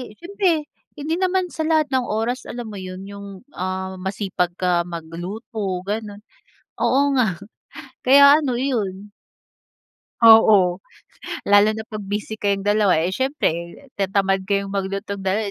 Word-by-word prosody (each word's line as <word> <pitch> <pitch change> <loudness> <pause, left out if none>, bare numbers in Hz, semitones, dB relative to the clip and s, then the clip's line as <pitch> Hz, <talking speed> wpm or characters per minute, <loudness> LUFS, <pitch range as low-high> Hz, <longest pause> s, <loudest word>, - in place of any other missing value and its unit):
siyempre 345 - -1 0.3
hindi 305 +3 -2
naman 370 -1 0
sa 320 - -3
lahat 315 -2 +2
ng 260 -1 +1
oras 230 +4 -2
alam 240 -1 -6
mo 205 - -8
yun 185 0 -8
yung, 200 0 -9 0.3
ah, 185 +1 -4
masipag 190 -2 -2
ka 180 -2 +2
magluto 180 +4 -5
ganun 210 -1 -5 0.6
oo 280 +1 +2
nga 215 -9 +1 0.7
kaya 280 +3 +7
ano, 260 -5 -1
iyon. 205 -7 -3 1.2
Oo, 220 -2 +7 0.8
lalo 205 +1 +5
na 220 - -5
pag 215 - -4
busy 210 +2 -4
kayong 200 -1 0
dalawa. 205 -3 +3
Eh, 180 - -1
siyempre 265 - 0 0.5
tinatamad 195 -1 0
kayong 200 -1 -1
maglutong 195 0 -3
dalawa, 200 +2 -1
205 Hz, 130 wpm, -21 LUFS, 190-255 Hz, 1.2 s, kaya